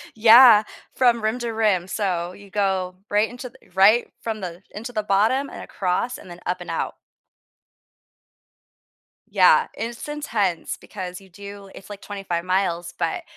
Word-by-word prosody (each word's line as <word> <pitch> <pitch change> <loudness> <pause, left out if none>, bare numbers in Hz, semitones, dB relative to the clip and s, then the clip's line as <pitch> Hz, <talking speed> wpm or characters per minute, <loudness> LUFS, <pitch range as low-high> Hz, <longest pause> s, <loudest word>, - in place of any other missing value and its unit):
Yeah. 225 0 +8 0.3
From 240 -3 +2
rim 220 +3 0
to 235 -1 -3
rim, 210 -5 +1
so 180 -3 -2
you 200 +1 -15
go 190 -3 -1
right 210 +2 +2
into 245 +1 -8
th 190 -6 -24
right 210 +5 +5
from 220 -2 -4
the 175 -1 -7
into 230 +4 -7
the 215 - 0
bottom 215 +7 +1
and - - -9
across 190 +6 -2
and - - -14
then 175 0 -10
up 180 +1 -2
and - - -9
out. - - -3 2.3
Yeah, - - +5
it's 235 +5 -6
intense 225 - -2
because 180 -3 -8
you 190 - -18
do 200 +1 -11
it's, 195 - -13
like, 205 -1 -9
25 195 -4 -4
miles, 175 -2 -1
but, 360 -3 -2
205 Hz, 155 wpm, -23 LUFS, 185-230 Hz, 2.3 s, Yeah